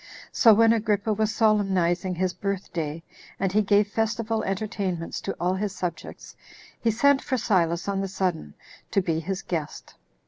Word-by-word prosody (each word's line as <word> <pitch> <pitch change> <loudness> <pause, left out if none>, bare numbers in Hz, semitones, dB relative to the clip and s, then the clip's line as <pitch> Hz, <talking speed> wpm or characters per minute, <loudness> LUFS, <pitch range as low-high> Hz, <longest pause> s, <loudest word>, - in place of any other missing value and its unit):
So 230 - +6
when 225 +1 +5
Agrippa 215 -1 0
was 215 +1 0
solemnizing 190 -5 +1
his 185 +1 -1
birth 200 -1 -4
day, 160 -1 -3 0.4
and 195 -1 0
he 210 +2 +3
gave 205 0 +3
festival 225 +1 -1
entertainments 195 -4 -3
to - - -3
all 180 +1 +1
his 195 0 -3
subjects, 170 -3 -6 0.4
he 230 - +1
sent 270 +5 +3
for 260 - -1
Silas 175 -7 +1
on 195 -1 -1
the 195 - -2
sudden 185 - -3 0.3
to 195 - +2
be 165 -2 0
his 190 +3 -4
guest. 160 -4 -5
195 Hz, 165 wpm, -25 LUFS, 180-215 Hz, 0.4 s, So